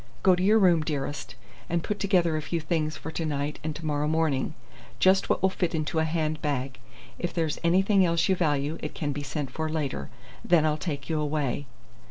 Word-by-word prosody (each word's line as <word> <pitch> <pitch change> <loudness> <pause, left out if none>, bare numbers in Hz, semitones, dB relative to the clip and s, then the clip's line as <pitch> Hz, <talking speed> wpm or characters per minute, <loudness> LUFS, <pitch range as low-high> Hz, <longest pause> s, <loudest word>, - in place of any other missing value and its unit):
Go 190 - +6
to 180 - 0
your 210 +4 +5
room, 180 -6 +5
dearest, 145 -1 -4 0.3
and 170 -1 0
put 210 - -3
together 180 -5 +2
a 155 - -1
few 170 +2 -2
things 155 -1 -1
for 160 - -6
to 165 - -3
night 145 -1 -2
and 155 -1 -3
to 160 +2 -7
morrow 150 -1 0
morning 155 -2 0 0.4
just 190 +1 +4
what - - +1
will 190 - +4
fit 180 -2 -1
into 160 +1 -1
a 160 - +2
hand 155 -2 -1
bag. 135 -3 -2 0.4
If 175 -1 -3
there's 160 -3 0
anything 190 +3 +4
else 170 0 +2
you 190 - +3
value, 150 -2 0
it - - -5
can 145 -3 -2
be 145 +1 -4
sent 140 -1 -4
for 160 +3 -2
later. 155 -4 -3 0.3
Then 170 -3 +4
I'll 155 -1 +2
take 145 -3 -4
you 160 -2 0
away." 145 -2 -1
155 Hz, 215 wpm, -27 LUFS, 150-170 Hz, 0.4 s, Go